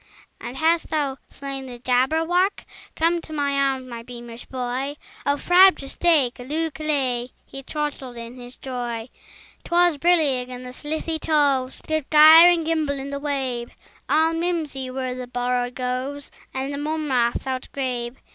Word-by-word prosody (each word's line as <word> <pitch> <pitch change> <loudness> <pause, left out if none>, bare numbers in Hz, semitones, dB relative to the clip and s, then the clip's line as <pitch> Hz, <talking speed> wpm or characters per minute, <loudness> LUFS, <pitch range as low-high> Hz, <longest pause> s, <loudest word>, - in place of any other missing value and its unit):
"And 245 +2 -7
hast 325 +2 +2
thou 285 -4 -1
slain 275 -1 -6
the 245 -1 -8
Jabberwock? 320 +10 +1 0.3
Come 335 +1 +1
to 320 - -13
my 285 -2 0
arms, 270 -2 0
my 235 -2 -7
beamish 240 0 -10
boy! 260 +2 -3 0.3
O 285 0 +2
frabjous 355 -5 +5
day! 310 -8 +3
Callooh! 305 +6 -3
Callay!" 270 -6 -1 0.2
He 270 - -9
chortled 275 -4 -4
in 235 0 -7
his 245 0 -11
joy. 240 -3 -5 0.5
'Twas 345 -3 +3
brillig, 290 -7 +2
and 250 0 -8
the 250 - -8
slithy 315 +3 -3
toves 280 -5 +1
Did 315 -3 -2
gyre 315 +3 +9
and 340 -2 +2
gimble 310 -3 0
in 275 +1 -6
the 280 - -3
wabe: 265 -5 -2 0.4
All 320 +3 +3
mimsy 325 -6 -2
were 255 0 -3
the 250 0 -6
borogoves, 250 +3 -2 0.2
And 265 +2 -3
the 280 - -4
mome 310 +1 -2
raths 240 -1 +1
outgrabe. 255 -2 -3
275 Hz, 150 wpm, -23 LUFS, 250-315 Hz, 0.5 s, gyre